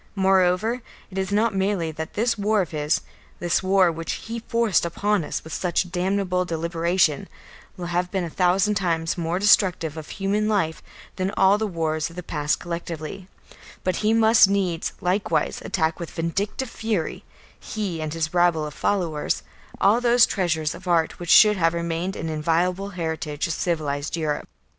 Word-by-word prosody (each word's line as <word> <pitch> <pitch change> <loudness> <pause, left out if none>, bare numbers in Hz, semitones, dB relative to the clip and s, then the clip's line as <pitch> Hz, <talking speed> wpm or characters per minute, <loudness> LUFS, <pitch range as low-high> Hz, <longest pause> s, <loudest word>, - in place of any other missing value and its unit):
Moreover 190 +4 +2 0.3
it 190 - -3
is 190 +1 -2
not 215 +2 +2
merely 190 -4 0
that 160 +1 -7
this 230 +3 +1
war 210 0 +1
of 175 - -10
his, 150 -1 0 0.4
this 175 0 0
war 190 -2 +4
which 165 0 -4
he 230 +1 -6
forced 230 -4 +1
upon 200 +3 0
us - - -4
with 160 - -9
such 180 0 -1
damnable 185 0 0
deliberation, 170 +1 0 0.5
will 180 - -5
have 175 +1 -1
been 190 -1 -1
a 170 - -4
thousand 185 +4 +2
times 165 -4 0
more 170 0 -1
destructive 185 -6 +3
of 155 - -8
human 205 +2 -1
life 175 -7 0 0.4
than 185 0 0
all 195 +2 +5
the 220 - 0
wars 160 -4 -1
of 165 - -14
the 180 - -6
past 150 -2 -1
collectively, 170 +1 -6 0.6
but 185 -2 0
he 215 0 +1
must 225 -2 +6
needs 185 -4 -1
likewise 185 +3 0
attack 160 -3 -1
with 170 - -5
vindictive 200 +9 -3
fury, 220 -7 -2 0.4
he 195 -7 -4
and 155 0 -4
his 160 0 -2
rabble 175 -3 +3
of 150 - -6
followers, 170 -6 -1 0.4
all 215 +5 +4
those 240 0 +5
treasures 160 -5 -1
of 185 - -11
art 165 -2 +1
which 175 -1 -6
should 210 +2 +7
have 165 -1 +2
remained 170 +2 -2
an 165 - -4
inviolable 170 +5 0
heritage 160 -4 -3
of 170 - -2
civilised 150 -3 -2
Europe. 155 -2 -2
180 Hz, 170 wpm, -24 LUFS, 165-200 Hz, 0.6 s, should